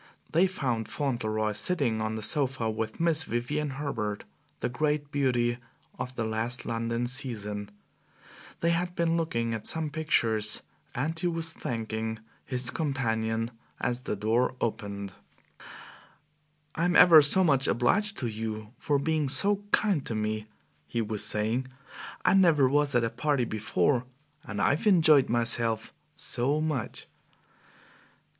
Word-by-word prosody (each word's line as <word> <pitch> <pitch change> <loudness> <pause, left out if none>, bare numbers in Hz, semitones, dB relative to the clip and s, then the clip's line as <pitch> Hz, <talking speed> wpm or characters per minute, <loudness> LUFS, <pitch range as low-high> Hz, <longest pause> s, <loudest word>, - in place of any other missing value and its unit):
They 175 +4 +4
found 125 -11 -2
Fauntleroy 110 -6 -1
sitting 120 -2 0
on 110 0 -2
the 110 - -5
sofa 135 -4 +1
with 110 0 -4
Miss 165 -2 +2
Vivian 145 +6 -2
Herbert, 110 -8 -3 0.4
the - - -1
great 150 +3 -1
beauty 120 -4 +1 0.4
of 125 +1 -5
the 115 - -2
last 110 +3 -3
London 115 +1 -2
season; 110 -6 -2 0.9
they 170 - +2
had 175 +1 -1
been 170 -1 +1
looking 115 -9 -1
at 110 - -4
some 160 -2 -1
pictures, 115 -9 0 0.3
and 160 +6 -2
he 175 - 0
was 165 -1 -1
thanking 110 -3 -4 0.3
his 125 -2 0
companion 115 -6 -1 0.3
as 125 0 -2
the 115 - -3
door 115 +5 +1
opened. 100 -3 -4 1.6
"I'm 175 +2 0
ever 165 -3 +9
so 170 +7 +4
much 140 -6 +3
obliged 200 - +1
to 125 - -1
you 110 0 -5
for 150 -3 +1
being 155 0 0
so 200 +8 +5
kind 195 -10 +2
to 115 - -2
me!" 110 0 -2 0.4
he 115 +9 -1
was 105 -1 0
saying; 110 +5 +2 0.6
"I - - +5
never 165 -8 +5
was 145 0 +1
at 120 - +3
a 115 - -1
party 135 +1 0
before, 115 +4 0 0.4
and 105 -5 -5
I've 145 - +1
enjoyed 155 -8 +5
myself 115 -1 +1 0.2
so 135 +5 -1
much!" 155 -6 -3
125 Hz, 135 wpm, -28 LUFS, 110-150 Hz, 1.6 s, ever